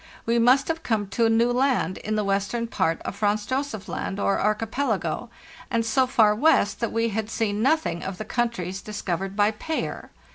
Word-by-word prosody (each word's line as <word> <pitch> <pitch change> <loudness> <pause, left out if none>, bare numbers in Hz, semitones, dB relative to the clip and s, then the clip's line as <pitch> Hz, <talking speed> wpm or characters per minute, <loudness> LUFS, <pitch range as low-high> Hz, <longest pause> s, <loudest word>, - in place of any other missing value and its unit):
We 235 +1 +2
must 255 +4 +4
have 325 0 -2
come 220 -8 0
to 230 +3 +2
a - - +2
new 230 +2 +3
land 250 -8 +1
in 215 +1 -3
the 210 - +1
western 200 +4 -1
part 165 -7 0
of - - -5
Franz 210 0 0
Josef 260 -4 -3
Land 195 - -4
or 200 - +1
Archipelago, 215 - -1 0.4
and 230 -3 0
so 255 +4 +2
far 220 -4 +4
west 210 -4 +3
that 235 - -1
we 230 0 +1
had 220 0 -3
seen 215 -2 -1
nothing 270 - +1
of 190 -1 -5
the 215 - -5
countries 200 -6 -2
discovered 195 -2 -4
by 205 +1 +3
Payer. 315 +9 -4
220 Hz, 190 wpm, -25 LUFS, 200-240 Hz, 0.4 s, must